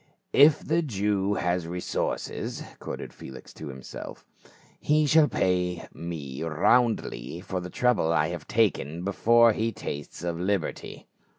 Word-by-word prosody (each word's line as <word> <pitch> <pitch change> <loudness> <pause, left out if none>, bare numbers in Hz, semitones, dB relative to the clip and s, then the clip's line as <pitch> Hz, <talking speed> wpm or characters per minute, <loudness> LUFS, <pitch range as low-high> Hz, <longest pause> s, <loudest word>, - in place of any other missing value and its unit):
"If 145 +2 +6
the 165 +2 +2
Jew 105 - 0
has 90 -2 -1
resources," 90 +1 -3 0.2
quoth - - -6
Felix 65 -1 -11
to - - -8
himself, 65 -2 -9 0.5
"he 150 +1 +3
shall 155 +1 +5
pay 90 -5 0
me 75 -6 -6
roundly 80 - +1
for 95 0 -4
the 90 0 -6
trouble 120 -7 +2
I 80 -1 +2
have 85 -4 -6
taken 85 -7 +1
before 115 +4 +4
he 115 +2 -1
tastes 75 -5 -7
of 85 -1 -2
liberty." 95 -1 -2
90 Hz, 130 wpm, -27 LUFS, 80-115 Hz, 0.5 s, If